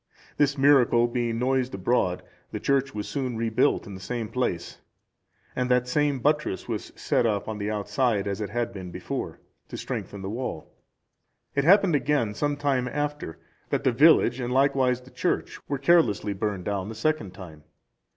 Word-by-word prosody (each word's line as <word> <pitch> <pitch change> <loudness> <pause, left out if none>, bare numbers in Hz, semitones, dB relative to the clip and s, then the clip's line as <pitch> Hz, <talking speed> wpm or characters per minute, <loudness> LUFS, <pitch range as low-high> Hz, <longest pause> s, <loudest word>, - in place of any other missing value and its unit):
This 145 0 +2
miracle 135 -4 +5
being 120 -1 -1
noised 130 -1 0
abroad, 95 -2 0 0.3
the - - -4
church 135 -2 0
was 105 -1 -4
soon 130 -5 -3
rebuilt 115 -1 +1
in 100 - -9
the 95 - -8
same 115 +3 -4
place, 90 -9 -3 0.8
and 125 0 -1
that 125 0 +2
same 145 +1 +1
buttress 150 -5 0
was - - -4
set 120 - +1
up 105 -3 -1
on 110 -1 -4
the 105 +1 -2
outside, 105 0 0
as 100 +1 -3
it 105 - -3
had 120 +2 -2
been 95 -2 -7
before, - - -5 0.3
to - - -7
strengthen 100 -1 -5
the - - -4
wall. 115 -9 -5 0.8
It 140 0 +1
happened 195 0 +5
again, 135 -6 +1
some 145 +6 -1
time 135 -3 0
after, 145 - -3 0.3
that - - -1
the 130 - +3
village 135 -1 +5
and 125 -1 -3
likewise 130 -2 +2
the 130 +1 -16
church - - -2
were 140 - 0
carelessly 135 - +3
burned 100 -2 -3
down 100 -1 -2
the 110 - -7
second 110 -7 -1
time. 80 -6 -11
125 Hz, 175 wpm, -26 LUFS, 105-140 Hz, 0.8 s, miracle